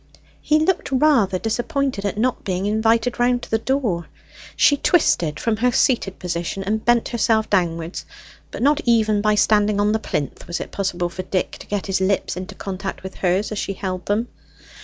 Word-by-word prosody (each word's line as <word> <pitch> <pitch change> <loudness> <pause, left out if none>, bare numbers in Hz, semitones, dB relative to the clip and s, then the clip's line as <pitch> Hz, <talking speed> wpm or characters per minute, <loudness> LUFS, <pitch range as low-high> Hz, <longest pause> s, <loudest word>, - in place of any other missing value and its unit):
He 305 - +3
looked 315 +1 0
rather 260 -9 +3
disappointed 240 +2 -2
at 200 +1 -2
not 250 +3 0
being 185 0 -2
invited 225 +3 +1
round 245 0 +2
to - - -10
the 225 - +2
door. 225 - -1 0.5
She 290 - +5
twisted 170 - +2
from 225 -2 0
her 250 +3 +2
seated 230 -6 +1
position 175 +2 -3
and 215 +3 -1
bent 240 -1 +2
herself 220 -2 +1
downwards, 170 -3 0 0.5
but - - -5
not 295 +2 +3
even 220 -3 +3
by 215 0 +2
standing 210 -1 +3
on 205 +1 +2
the 220 - +1
plinth 145 - -4
was 170 - -3
it - - -6
possible 175 -3 -2
for 180 +2 -6
Dick 185 0 -2
to - - -12
get 205 -2 -2
his 190 -1 -1
lips 190 +1 0
into 185 +1 -7
contact 195 0 -5
with 190 - -7
hers 185 +4 0
as 210 - -3
she 195 - -3
held 185 -1 -5
them. 215 +4 0
210 Hz, 190 wpm, -21 LUFS, 185-235 Hz, 0.5 s, She